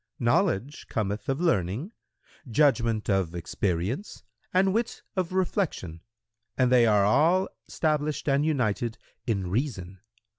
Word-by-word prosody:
"—"Knowledge 125 Hz, +10 st, 0 dB
cometh 105 Hz, +1 st, -2 dB
of 135 Hz, +2 st, 0 dB
learning, 135 Hz, -, 0 dB, 0.6 s
judgment 115 Hz, -4 st, +2 dB
of 95 Hz, -4 st, 0 dB
experience 95 Hz, -, -3 dB, 0.3 s
and 190 Hz, +1 st, +3 dB
wit 230 Hz, +2 st, -2 dB
of 185 Hz, -2 st, -1 dB
reflection, 180 Hz, -, -1 dB, 0.6 s
and 125 Hz, -1 st, +3 dB
they 120 Hz, -2 st, +6 dB
are 105 Hz, -2 st, +4 dB
all 170 Hz, -, +3 dB, 0.2 s
stablished 155 Hz, -1 st, -1 dB
and 140 Hz, 0 st, +3 dB
united 120 Hz, -6 st, 0 dB, 0.3 s
in 95 Hz, -6 st, -1 dB
reason. 95 Hz, -6 st, -3 dB
125 Hz, 115 wpm, -27 LUFS, 100-155 Hz, 0.6 s, they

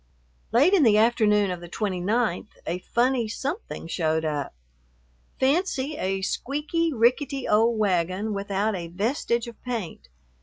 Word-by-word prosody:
Late 285 Hz, -, +4 dB
in 385 Hz, -, +5 dB
the 220 Hz, -6 st, +5 dB
afternoon 215 Hz, -3 st, +3 dB
of 180 Hz, -1 st, -5 dB
the 175 Hz, -, -10 dB
29th 210 Hz, +4 st, -1 dB, 0.2 s
a 175 Hz, +2 st, -2 dB
funny 240 Hz, +4 st, +1 dB
something 280 Hz, -, -5 dB
showed 160 Hz, -1 st, 0 dB
up. 145 Hz, -, -3 dB, 0.8 s
Fancy 285 Hz, 0 st, +1 dB
a 190 Hz, -5 st, -2 dB
squeaky, 300 Hz, -, -1 dB
rickety 260 Hz, +2 st, +1 dB
old 225 Hz, +2 st, +3 dB
wagon 190 Hz, +1 st, 0 dB
without 200 Hz, +1 st, -1 dB
a 170 Hz, -2 st, -5 dB
vestige 230 Hz, -, -1 dB
of 235 Hz, -2 st, -11 dB
paint. 220 Hz, -, -5 dB
220 Hz, 130 wpm, -25 LUFS, 185-260 Hz, 0.8 s, in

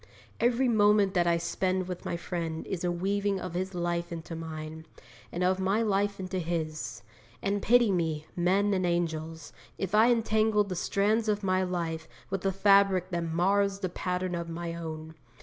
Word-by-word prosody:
Every 245 Hz, +2 st, +2 dB
moment 205 Hz, -3 st, +4 dB
that 175 Hz, -2 st, +2 dB
I 170 Hz, 0 st, +3 dB
spend 185 Hz, +2 st, -1 dB
with 180 Hz, -1 st, -6 dB
my 170 Hz, -, -2 dB
friend 165 Hz, -2 st, -4 dB
is 180 Hz, -2 st, -4 dB
a 175 Hz, -, +1 dB
weaving 195 Hz, +2 st, 0 dB
of 185 Hz, -2 st, -6 dB
his 185 Hz, +1 st, -3 dB
life 175 Hz, 0 st, -2 dB
into 165 Hz, 0 st, -6 dB
mine, 160 Hz, 0 st, -7 dB, 0.4 s
and 175 Hz, -, -2 dB
of 185 Hz, +1 st, +2 dB
my 195 Hz, +4 st, +1 dB
life 200 Hz, -1 st, 0 dB
into 185 Hz, 0 st, -3 dB
his; 160 Hz, -2 st, -3 dB, 0.4 s
and 200 Hz, +1 st, -1 dB
pity 240 Hz, -2 st, +4 dB
me, 160 Hz, -4 st, -1 dB
men 195 Hz, +4 st, +2 dB
and 185 Hz, -1 st, +1 dB
angels, 165 Hz, -2 st, -2 dB, 0.2 s
if 195 Hz, 0 st, -3 dB
I 220 Hz, +3 st, +6 dB
entangle 220 Hz, -2 st, +2 dB
the 195 Hz, -2 st, -5 dB
strands 215 Hz, +5 st, +1 dB
of 210 Hz, 0 st, 0 dB
my 185 Hz, -1 st, +2 dB
life 165 Hz, -3 st, -2 dB, 0.2 s
with 195 Hz, -1 st, -2 dB
a -, -, +2 dB
fabric 195 Hz, -1 st, +4 dB
that 170 Hz, -1 st, -1 dB
mars 195 Hz, +4 st, +2 dB
the 185 Hz, -, -1 dB
pattern 180 Hz, +1 st, -2 dB
of 170 Hz, -1 st, -3 dB
my 170 Hz, 0 st, -4 dB
own! 160 Hz, -1 st, -6 dB
185 Hz, 180 wpm, -29 LUFS, 170-200 Hz, 0.4 s, I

